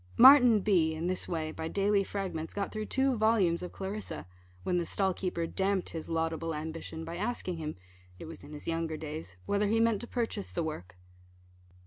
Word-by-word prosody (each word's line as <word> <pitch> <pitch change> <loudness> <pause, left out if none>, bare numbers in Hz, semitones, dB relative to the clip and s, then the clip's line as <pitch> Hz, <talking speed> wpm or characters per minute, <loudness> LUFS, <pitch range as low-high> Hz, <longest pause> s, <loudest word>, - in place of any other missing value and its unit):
Martin 250 -4 +9
B, 170 -6 +3
in 160 +2 -3
this 185 +1 -1
way, 160 -2 -2
by 160 - -4
daily 200 +2 +2
fragments, 185 -5 -4
got 200 -1 -2
through 215 -1 -4
two 265 -1 +2
volumes 215 -6 +3
of 180 - -5
Clarissa, 195 - -5 0.4
when 180 -1 +1
the - - 0
stall 190 +3 0
keeper 180 -2 -2
damped 190 +2 0
his 160 -1 -6
laudable 165 0 -1
ambition, 160 +1 -5
by 165 +1 -5
asking 200 -4 -2
him 155 -1 -4 0.4
(it - - -8
was 165 0 -9
in 145 - -11
his 150 -1 -7
younger 165 -1 -1
days) 155 - -6
whether 205 +1 +1
he 225 +2 +2
meant 230 -2 +3
to 240 - -4
purchase 225 -5 -2
the 170 - -2
work. 90 - -6
180 Hz, 190 wpm, -31 LUFS, 160-205 Hz, 0.4 s, Martin